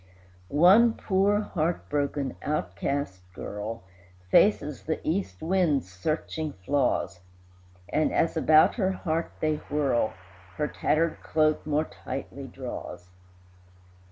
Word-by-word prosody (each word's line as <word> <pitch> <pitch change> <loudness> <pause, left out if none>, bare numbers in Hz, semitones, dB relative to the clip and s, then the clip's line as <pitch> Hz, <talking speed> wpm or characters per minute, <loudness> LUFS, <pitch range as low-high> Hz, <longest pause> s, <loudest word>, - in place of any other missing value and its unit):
One 190 - +6
poor, 200 +1 +2
heart 170 -4 -2
broken, 140 -2 -1
outcast 135 - -2
girl 105 +3 -6 0.5
Faces 150 -9 +3
the 160 - -1
east 155 - -2
wind's 160 - +1
searching 155 - -3
flaws, 110 -4 0 0.7
And, 155 - +1
as 165 - +1
about 155 -1 +5
her 190 -4 +1
heart 165 -2 -2
they 155 -1 +1
whirl, 140 -7 +1 0.4
Her 150 - -1
tattered 160 +2 0
cloak 155 -1 +1
more 155 +1 +1
tightly - - -7
draws. 90 0 -8
155 Hz, 105 wpm, -27 LUFS, 135-165 Hz, 0.7 s, One